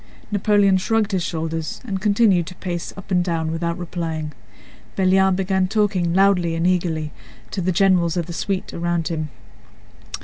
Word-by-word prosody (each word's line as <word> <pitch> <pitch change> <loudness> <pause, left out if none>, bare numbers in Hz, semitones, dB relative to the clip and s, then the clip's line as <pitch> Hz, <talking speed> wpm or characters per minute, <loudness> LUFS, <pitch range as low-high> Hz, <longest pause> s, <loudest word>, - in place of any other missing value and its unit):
Napoleon 205 -1 +3
shrugged 215 +2 +1
his 190 -2 0
shoulders 160 -1 -3
and 195 -5 -3
continued 200 -4 +3
to 185 - -8
pace 175 -2 -4
up 195 0 -11
and 180 -1 +3
down 165 -2 -1
without 170 +1 -2
replying. 165 -3 -4 0.6
Belliard 190 0 +3
began 190 0 +1
talking 195 -4 +1
loudly 180 -3 +3
and 165 +1 0
eagerly 170 -4 0 0.4
to 190 - -2
the 185 +1 +1
generals 180 -2 +3
of 170 - 0
the 170 - -7
suite 195 +2 -3
around 170 -1 -1
him. 155 -2 -3
180 Hz, 160 wpm, -21 LUFS, 170-195 Hz, 0.6 s, Napoleon